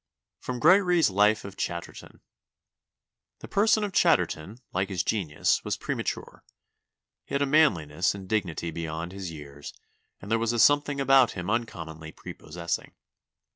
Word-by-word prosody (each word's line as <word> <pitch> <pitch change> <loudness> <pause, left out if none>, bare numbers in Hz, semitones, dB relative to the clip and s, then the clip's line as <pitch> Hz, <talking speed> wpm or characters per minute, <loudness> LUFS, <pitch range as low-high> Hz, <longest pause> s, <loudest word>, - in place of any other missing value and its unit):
[Sidenote: 125 -1 -5
Gregory's 180 - +5
Life 105 +2 +3
of 100 -1 -8
Chatterton. 85 -3 -6 0.6
*] - - -64
"The - - -8
person 215 +1 +3
of 205 -2 -3
Chatterton, 95 - +1 0.2
like 95 +2 -1
his 95 -3 -1
genius, 85 -9 0
was - - -2
premature; - - -4 0.8
he - - -6
had 140 - +2
a - - +2
manliness 95 - +2
and 95 -1 -9
dignity 90 -5 -2
beyond 80 +1 -5
his 95 -2 -6
years, 70 -2 -10 0.4
and 100 - -10
there 115 - +3
was 115 0 0
a - - -1
something 145 +3 +4
about 135 -2 +5
him 90 +1 -4
uncommonly 80 -9 -4
prepossessing. 85 +2 -6
100 Hz, 145 wpm, -27 LUFS, 85-135 Hz, 0.8 s, Gregory's